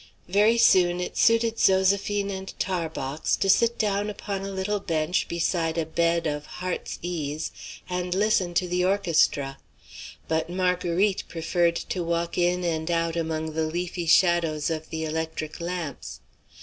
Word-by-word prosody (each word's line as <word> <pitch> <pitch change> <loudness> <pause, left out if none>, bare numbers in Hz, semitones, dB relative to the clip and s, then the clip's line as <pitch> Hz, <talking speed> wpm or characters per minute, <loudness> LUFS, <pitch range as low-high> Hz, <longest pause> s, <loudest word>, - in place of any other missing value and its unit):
Very 210 +5 +4
soon 180 -6 +5
it 180 - -4
suited 230 0 +3
Zoséphine 200 +1 +2
and 190 0 -7
Tarbox 160 -6 -1
to - - -1
sit 235 +3 +2
down 205 -1 0
upon 200 -1 -4
a 195 - -5
little 195 +2 -2
bench 165 -2 -1
beside 170 -1 -1
a 165 - 0
bed 170 +1 +1
of 150 -1 -3
heart's 180 -1 -4
ease 155 -3 -3 0.4
and 180 0 -2
listen 195 -4 +1
to 180 - +2
the 180 +1 0
orchestra. 165 -8 +1 0.7
But 160 +1 -1
Marguerite 180 +2 +1
preferred 170 +1 +1
to 180 +1 -3
walk 170 0 -1
in 180 +1 +1
and 160 -1 -1
out 165 -1 0
among 160 -1 -2
the 160 0 0
leafy 175 +1 -3
shadows 165 -3 +3
of 160 -1 -4
the 160 0 -3
electric 160 0 -4
lamps. 170 -5 -5
175 Hz, 150 wpm, -25 LUFS, 160-190 Hz, 0.7 s, soon